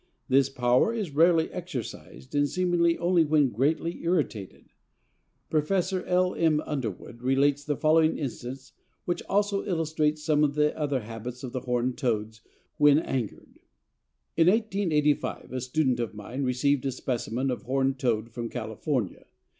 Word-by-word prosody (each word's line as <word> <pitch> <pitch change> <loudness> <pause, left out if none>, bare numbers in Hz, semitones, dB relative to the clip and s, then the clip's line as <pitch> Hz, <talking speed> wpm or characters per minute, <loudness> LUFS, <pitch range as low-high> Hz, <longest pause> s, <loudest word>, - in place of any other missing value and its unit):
This 135 0 +4
power 125 - +2
is 200 -10 -3
rarely 165 +1 +4
exercised 125 - -7
and 145 0 +2
seemingly 175 0 +2
only 175 -1 +3
when 150 -4 +3
greatly 155 +9 0
irritated. 150 - -2 0.8
Professor 185 +4 0
L. 180 0 +2
M. 160 -2 +2
Underwood 120 -4 -5
relates 135 +2 +2
the 145 0 -1
following 160 +1 +3
instance, 130 -1 -6 0.3
which 175 - -1
also 200 0 +1
illustrates 155 -4 0
some 150 -1 +2
of 145 -1 +1
the 150 0 +2
other 145 -4 -1
habits 115 +3 -7
of 125 - -5
the 130 - -3
Horned 125 +1 -1
Toads 110 -4 -2 0.4
when 145 -2 +6
angered: 130 -8 -4 0.8
"In 165 0 +4
1885 185 -8 +1
a 130 0 -3
student 130 -1 0
of 115 -3 -3
mine 115 +6 -6
received 130 +2 +1
a - - 0
specimen 125 +1 -2
of 125 - -4
Horned 135 +1 0
Toad 115 -2 0
from 115 0 -5
California. 115 - -3
145 Hz, 145 wpm, -27 LUFS, 125-160 Hz, 0.8 s, when